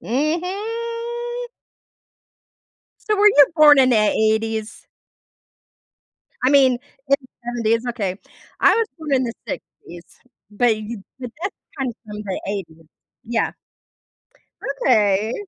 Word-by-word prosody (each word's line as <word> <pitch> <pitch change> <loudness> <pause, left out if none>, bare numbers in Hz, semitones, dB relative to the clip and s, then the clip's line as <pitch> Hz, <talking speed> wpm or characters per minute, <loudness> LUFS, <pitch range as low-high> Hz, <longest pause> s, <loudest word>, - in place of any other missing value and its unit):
Mhm. 460 - -3 1.6
So 425 - +3
were 415 - +4
you 290 -9 +7
born 295 -2 +8
in 260 -1 +5
the 240 - +4
‘80s? 220 +1 0 1.6
I 255 - +4
mean, 270 -3 +5 0.4
in 275 - +6
the 260 - -18 0.2
‘70s. 230 -1 0
Okay. 200 -6 -3 0.4
I - - +6
was 455 -1 +1
born 305 -3 -3
in 260 -1 +3
the 235 - -3
‘60s, 175 0 -8 0.5
but 225 +2 +2
you 215 -1 -7 0.2
but 250 -3 -6
that's 390 - -3 0.2
kinda 260 -3 -2
from 210 -1 -8
the 195 -3 -4
‘80s. 165 -5 -6 0.4
Yeah. 230 -1 -1 1.3
Okay. 215 -2 +3
245 Hz, 115 wpm, -21 LUFS, 215-310 Hz, 1.6 s, born